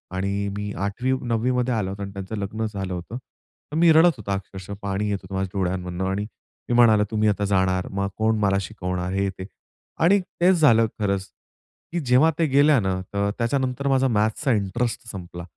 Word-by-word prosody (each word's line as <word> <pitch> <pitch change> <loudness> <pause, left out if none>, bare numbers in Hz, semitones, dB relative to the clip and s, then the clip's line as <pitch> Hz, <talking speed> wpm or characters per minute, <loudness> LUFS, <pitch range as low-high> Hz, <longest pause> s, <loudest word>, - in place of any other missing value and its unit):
आणि 100 +1 -1
मी 105 0 -4
8वी, 125 +6 -1
9वी 120 +1 0
मध्ये 125 0 0
आला 105 -4 -1
होता 100 +1 -6
आणि 100 - -6
त्यांचं 100 +2 -6
लग्न 105 +3 -3
झालं 95 -2 -4
होतं. 90 +7 -6
तर 130 +3 -15
मी 170 0 +6
रडत 165 0 +6
होतो 100 -2 -6
अक्षरशः 95 0 -5
पाणी 100 +1 -2
येत 100 - 0
होतं 95 +1 -7
माझ्या 95 -1 -1
डोळ्यांमधून. 90 -1 -2
आणि 100 +2 -1 0.5
मी - - +1
म्हणालो 110 -3 +6
तुम्ही 110 -1 +2
आता 100 0 0
जाणार, 95 -2 +1
मग 100 0 -1
कोण 110 0 +2
मला 100 -1 +2
शिकवणार 90 -3 -4
हे 100 0 0
ते. 95 0 -8 0.6
आणि 195 +4 +5 0.2
तेच 185 +2 +5
झालं 115 -7 +5
खरंच, 100 -1 -1 0.6
की 175 - -1
जेव्हा 140 +3 +4
ते 165 - +4
गेल्या 145 +1 +4
ना 95 -3 0
अ, - - -4
तर 100 0 0
त्याच्यानंतर 130 +2 -1
माझा 135 -1 +3
मॅथ्सचा 110 +5 +1
इंटरेस्ट 110 +3 -2
संपला. 85 -3 -8
105 Hz, 195 wpm, -23 LUFS, 95-125 Hz, 0.6 s, मी